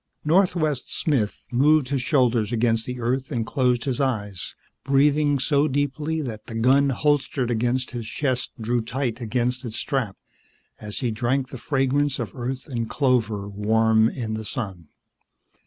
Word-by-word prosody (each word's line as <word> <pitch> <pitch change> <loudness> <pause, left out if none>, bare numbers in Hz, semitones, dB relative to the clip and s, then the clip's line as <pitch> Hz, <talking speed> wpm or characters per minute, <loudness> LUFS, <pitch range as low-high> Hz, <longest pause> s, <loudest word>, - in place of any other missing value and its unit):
Northwest 155 -5 +2
Smith 125 -10 -1
moved 140 +2 +4
his 140 -2 0
shoulders 125 -7 +2
against 115 -1 +1
the 125 0 -4
earth 130 +5 -1
and 115 -4 -1
closed 125 -2 +1
his 135 -1 -1
eyes, 105 - -2 0.3
breathing 145 +2 +3
so 145 +2 +2
deeply 145 +3 -1
that 110 -5 -7
the 115 - -7
gun 135 +5 +4
holstered 135 -2 +1
upon 120 +2 +1
his 125 -3 -4
chest 130 0 -1
drew 120 +2 0
tight 120 +1 -3
against 125 +2 -1
its 115 -3 -5
strap 125 -9 -2 0.6
as 105 +3 -5
he 120 -3 0
drank 125 +4 0
the 130 - -8
fragrance 135 +1 +1
of 115 -6 -5
Earth 130 +1 -4
and 115 -4 -3
clover 115 -7 +1
warm 110 +2 +3
in 115 -4 -4
the 110 0 -4
sun. 95 - -5
125 Hz, 155 wpm, -24 LUFS, 115-140 Hz, 0.6 s, moved